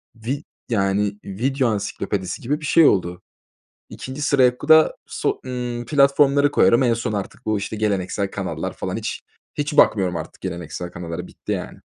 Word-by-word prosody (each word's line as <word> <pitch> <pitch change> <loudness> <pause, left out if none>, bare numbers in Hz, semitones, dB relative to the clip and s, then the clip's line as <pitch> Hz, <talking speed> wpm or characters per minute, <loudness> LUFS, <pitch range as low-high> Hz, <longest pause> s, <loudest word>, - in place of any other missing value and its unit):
vi 125 +6 -4 0.3
yani, 100 -1 0
video 130 +6 0
ansiklopedisi 100 -2 -3
gibi 145 +6 -2
bir - - -5
şey 165 +2 +5
oldu. 90 -5 +2 0.7
2'nci 135 +3 -7
sıraya 130 -3 +3
ku - - -8
da 160 0 +7
so - - -2
ımm, 120 -1 -4
platformları 140 0 +4
koyarım. 120 -3 +4
En 120 -2 +3
son 115 -2 -3
artık 100 -2 -5
bu, 110 -1 +1
işte, 100 +2 -5
geleneksel 100 -2 -1
kanallar - - -4
falan - - -4
hiç - - -4 0.3
hiç 145 0 -2
bakmıyorum 95 -4 +4
artık 80 0 -7
geleneksel 85 -1 -5
kanallara 85 -1 -6
bitti, - - -6
yani. - - -5
115 Hz, 160 wpm, -22 LUFS, 95-140 Hz, 0.7 s, da